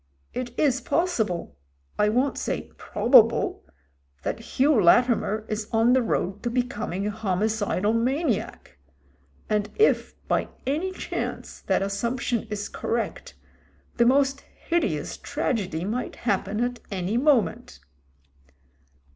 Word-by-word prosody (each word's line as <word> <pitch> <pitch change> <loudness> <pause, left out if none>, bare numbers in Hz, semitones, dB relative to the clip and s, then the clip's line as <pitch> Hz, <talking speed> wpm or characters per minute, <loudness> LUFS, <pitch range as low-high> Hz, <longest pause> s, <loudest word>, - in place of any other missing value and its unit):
It 245 -1 -5
is 270 -3 +2
possible 220 - -1 0.2
— 70 0 -35
^I 210 0 +4
won't 255 +4 +1
say - - -3
probable - - +3 0.3
— 70 0 -40
that - - -2
Hugh 255 +2 +2
Latimer 220 +2 +3
is 215 0 -3
on 225 +2 +4
the 260 - +4
road 200 -3 -1
to 240 - -1
becoming 235 -6 -2
a 210 - 0
homi 210 -1 0
cidal 210 -1 0
maniac. 240 - -1 0.7
And 210 -1 0
if, 435 - +2
by - - +1 0.2
any 315 +8 -1
chance, 375 - -5
that - - +1
assump 235 +6 -2
tion 230 -2 -1
is 205 -1 -3
correct, 230 0 -3 0.6
the 235 - +5
most 275 +1 +3 0.3
hideous 205 - 0
tragedy 200 - -2
might 235 +5 -3
happen 205 0 0
at 245 0 -2
any 195 +2 -1
moment. 240 - +1
225 Hz, 130 wpm, -25 LUFS, 200-255 Hz, 0.7 s, the